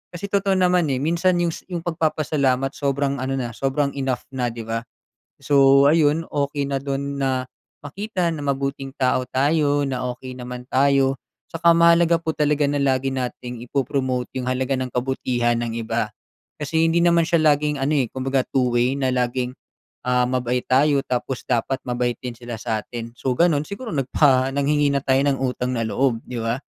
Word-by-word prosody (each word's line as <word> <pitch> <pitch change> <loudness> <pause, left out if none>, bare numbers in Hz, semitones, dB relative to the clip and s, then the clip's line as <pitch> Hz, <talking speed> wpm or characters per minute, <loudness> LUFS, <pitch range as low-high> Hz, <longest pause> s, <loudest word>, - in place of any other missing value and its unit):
Kasi 190 +4 -5
totoo 195 -1 +2
naman, 180 -3 +3
eh, 130 - -1
minsan 170 +4 +2
yung 170 -1 +1
sa - - -9
yung 170 -1 -3
pagpapasalamat 150 -5 0
sobrang 140 -1 -1
ano 135 +1 -2
na, 120 -2 -3
sobrang 140 +2 0
enough 130 -2 -1
na, 125 -2 -1
'di 115 0 -7
ba? 115 0 -1 0.6
So 140 -1 +5
ayun, 155 0 +3
okey 140 0 -2
na 135 - 0
do'n 140 0 -3
na 130 -1 0 0.4
makita 185 +2 -2
na 155 - -6
mabuting 135 -1 -2
tao 130 -1 +1
tayo 145 +1 +2
na 125 -1 -2
okey 130 +1 -9
naman 125 0 -7
tayo. 135 0 +3 0.3
Tsaka 170 0 +4
mahalaga 170 0 +5
po 160 - -1
talaga 150 0 +1
na 145 - 0
lagi 135 -1 +1
nating 125 -2 -4
ipo-promote 130 -2 -1
yung 125 - -4
halaga 130 +1 0
ng 130 - -2
kabutihan 125 -2 0
ng 115 - -4
iba - - -1 0.5
kasi 160 +2 0
hindi 170 +1 +2
naman 170 -1 +4
siya 170 -2 +2
laging 145 -1 0
ano, 135 - +1
eh, 130 -3 +1
kumbaga 135 0 0
two-way 125 0 +1
na 130 -2 0
laging, 125 0 -1 0.6
ah, 125 0 +3
mabait 125 0 -1
tayo 140 +2 +3
tapos 125 +1 -3
dapat 125 +2 0
mabait 120 -1 -1
din 125 -2 -5
sila 120 0 -7
sa'tin. 115 +1 -4
So 130 - -1
gano'n, 165 -4 +3
siguro 220 +7 -7
nagpa 135 -1 +3
nanghingi 145 +1 +2
na 140 - +1
tayo 135 0 +3
ng 140 -2 +1
utang 125 -1 -1
na 115 - 0
loob, 125 0 +1
'di 125 -2 -5
ba? 115 +3 -1
135 Hz, 175 wpm, -22 LUFS, 125-150 Hz, 0.6 s, So